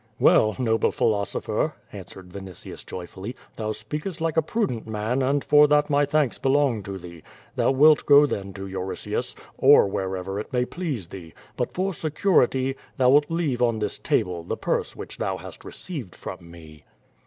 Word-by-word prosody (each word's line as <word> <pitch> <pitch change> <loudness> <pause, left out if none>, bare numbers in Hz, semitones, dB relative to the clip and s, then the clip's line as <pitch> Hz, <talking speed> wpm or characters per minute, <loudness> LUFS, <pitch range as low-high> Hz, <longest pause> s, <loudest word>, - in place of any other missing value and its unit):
"Well, 110 0 +5
noble 115 -3 +1
philosopher," 100 -3 -1 0.2
answered 95 -1 -10
Vinitius 95 -3 -9
Joyfidly, 95 +6 -7 0.2
"thou 110 -1 -3
speakest 150 - -4
like 165 -1 -1
a 160 - +4
prudent 145 - -2
man 110 +4 -1
and 140 +2 +1
for 150 0 +6
that 150 0 +2
my 145 0 +3
thanks 145 -3 +1
belong 135 -4 +2
to 100 0 -6
thee. 85 -2 -11 0.3
Thou - - +2
wilt 150 +3 +5
go 145 0 +8
then 100 -8 -4
to 95 0 -7
Euritius, 95 -1 -4 0.2
or - - +7
wherever 95 0 -3
it 105 - -7
may 125 -1 +1
please 140 - -4
thee, 85 -5 -10 0.2
but - - -2
for 190 +2 0
security, 145 -5 +1 0.2
thou 125 -1 +4
wilt 145 +1 +4
leave 160 -7 -1
on 115 -2 +2
this 105 -1 -3
table 90 -2 0
the - - -4
purse - - -2
which - - -9
thou 95 -1 -1
hast 95 0 -11
received 140 - -7
from 85 - -9
me." 80 -3 -14
120 Hz, 170 wpm, -24 LUFS, 95-145 Hz, 0.3 s, go